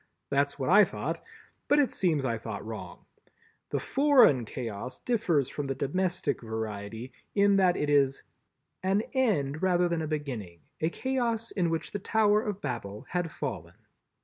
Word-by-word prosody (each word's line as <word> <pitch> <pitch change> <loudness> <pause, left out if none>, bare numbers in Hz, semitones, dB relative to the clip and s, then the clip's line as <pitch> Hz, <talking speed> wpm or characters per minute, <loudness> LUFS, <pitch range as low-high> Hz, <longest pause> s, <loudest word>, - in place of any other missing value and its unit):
That's 140 0 +1
what 135 +3 -1
I 210 +2 +8
thought, - - -3 0.5
but 290 - +4
it 280 -5 +3
seems 155 -7 +1
I 115 -3 -1
thought 110 -2 -6
wrong. 110 -1 -8 0.6
The - - -1
Foreign 265 - +5
Chaos 115 0 -5
differs 180 - +1
from 145 -2 -4
the 135 - -2
Domestic 175 -1 -1
variety 110 +1 -5 0.2
in 200 -1 +5
that 185 -2 +4
it 150 - 0
is 140 -2 +3 0.6
"an 190 +2 +2
end 155 - +1
rather 180 -1 +3
than 170 -1 -1
a 155 - -2
beginning, 125 - -4 0.2
a 160 - +1
Chaos 235 0 -1
in 175 -4 0
which 165 0 -2
the 205 - -3
Tower 210 +1 +3
of 210 -4 -4
Babel 110 -7 -5
had 175 -2 -1
fallen." 95 - -5
150 Hz, 160 wpm, -29 LUFS, 125-200 Hz, 0.6 s, I